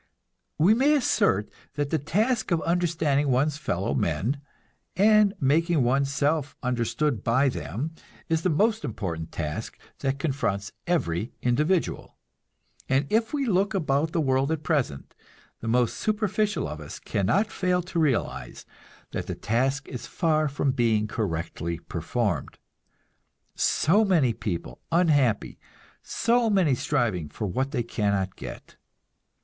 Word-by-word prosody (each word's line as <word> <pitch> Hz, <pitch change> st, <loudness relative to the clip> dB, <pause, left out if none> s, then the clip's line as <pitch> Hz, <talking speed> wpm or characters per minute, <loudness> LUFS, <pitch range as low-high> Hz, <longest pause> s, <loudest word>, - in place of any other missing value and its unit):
We 175 Hz, +8 st, +5 dB
may 275 Hz, +6 st, +4 dB
assert 105 Hz, -, +2 dB, 0.3 s
that 145 Hz, -1 st, -2 dB
the 160 Hz, -, +2 dB
task 215 Hz, -, 0 dB
of 170 Hz, -3 st, +2 dB
understanding 160 Hz, -5 st, +1 dB
one's 140 Hz, +4 st, +1 dB
fellow -, -, -1 dB
men, 135 Hz, +8 st, -1 dB, 0.5 s
and 210 Hz, 0 st, +5 dB
making 155 Hz, +2 st, +2 dB
one's 135 Hz, +3 st, +2 dB
self 145 Hz, 0 st, 0 dB
understood 125 Hz, 0 st, 0 dB
by 130 Hz, +4 st, +3 dB
them, 140 Hz, -, -4 dB, 0.3 s
is 160 Hz, -1 st, +1 dB
the 185 Hz, -, +1 dB
most 215 Hz, +8 st, +2 dB
important 85 Hz, -8 st, -4 dB
task 75 Hz, -2 st, -4 dB, 0.2 s
that 135 Hz, 0 st, -1 dB
confronts 105 Hz, -8 st, -1 dB, 0.2 s
every 110 Hz, -, 0 dB
individual. 150 Hz, +9 st, 0 dB, 0.7 s
And 135 Hz, +2 st, +2 dB
if 225 Hz, +1 st, +2 dB
we 285 Hz, -2 st, 0 dB
look 200 Hz, -1 st, +1 dB
about 155 Hz, -3 st, +1 dB
the 170 Hz, -, 0 dB
world 135 Hz, 0 st, +1 dB
at 160 Hz, -1 st, -2 dB
present, 140 Hz, -, -1 dB, 0.5 s
the 115 Hz, -, -6 dB
most 120 Hz, 0 st, +2 dB
superficial 215 Hz, -1 st, 0 dB
of 75 Hz, +1 st, -7 dB
us 75 Hz, -, -8 dB
cannot 125 Hz, -, 0 dB
fail 180 Hz, -1 st, 0 dB
to 175 Hz, -1 st, -3 dB
realize 115 Hz, -, -1 dB, 0.5 s
that -, -, -4 dB
the -, -, -3 dB
task 135 Hz, +5 st, 0 dB
is 125 Hz, -, -7 dB
far 155 Hz, -3 st, +1 dB
from 140 Hz, -1 st, 0 dB
being 115 Hz, -4 st, +1 dB
correctly 85 Hz, -5 st, -3 dB
performed. 90 Hz, +7 st, -2 dB, 1.0 s
So 200 Hz, +8 st, +3 dB
many 165 Hz, -, +3 dB
people 85 Hz, -, -5 dB
unhappy, 145 Hz, -, +2 dB, 0.4 s
so 235 Hz, 0 st, +1 dB
many 185 Hz, -9 st, +3 dB
striving 120 Hz, -, 0 dB
for 105 Hz, -, -5 dB
what 130 Hz, +8 st, -1 dB
they 130 Hz, -5 st, -1 dB
cannot 100 Hz, -4 st, -1 dB
get! -, -, -9 dB
140 Hz, 135 wpm, -26 LUFS, 115-175 Hz, 1.0 s, We